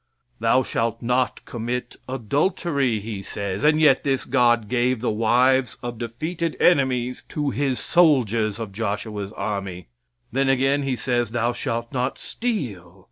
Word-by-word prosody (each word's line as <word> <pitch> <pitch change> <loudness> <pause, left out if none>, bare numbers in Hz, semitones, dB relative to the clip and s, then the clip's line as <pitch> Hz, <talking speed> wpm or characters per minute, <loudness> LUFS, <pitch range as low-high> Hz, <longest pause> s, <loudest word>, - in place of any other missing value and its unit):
"Thou 115 +3 +3
shalt 115 -1 -2
not 125 +1 0
commit 120 +1 -4
adultery," 140 - 0
he 105 -1 -5
says, 100 0 -4
and 150 +1 +4
yet 150 -4 +5
this 135 -3 0
God 120 -4 +3
gave 125 +1 +1
the 120 - 0
wives 125 +3 +2
of 120 -2 -5
defeated 155 +8 -3
enemies 130 -6 +2
to 145 -2 -1
His 135 -2 0
soldiers 115 - +3
of 115 -3 -5
Joshua's 105 -1 -3
army. 95 - -4 0.4
Then 135 +2 +1
again 135 +2 +2
He 135 -2 -1
says, 120 -2 0
"Thou 120 +1 0
shalt 115 0 -3
not 130 +1 -1
steal." 105 - -4
120 Hz, 140 wpm, -23 LUFS, 110-135 Hz, 0.4 s, yet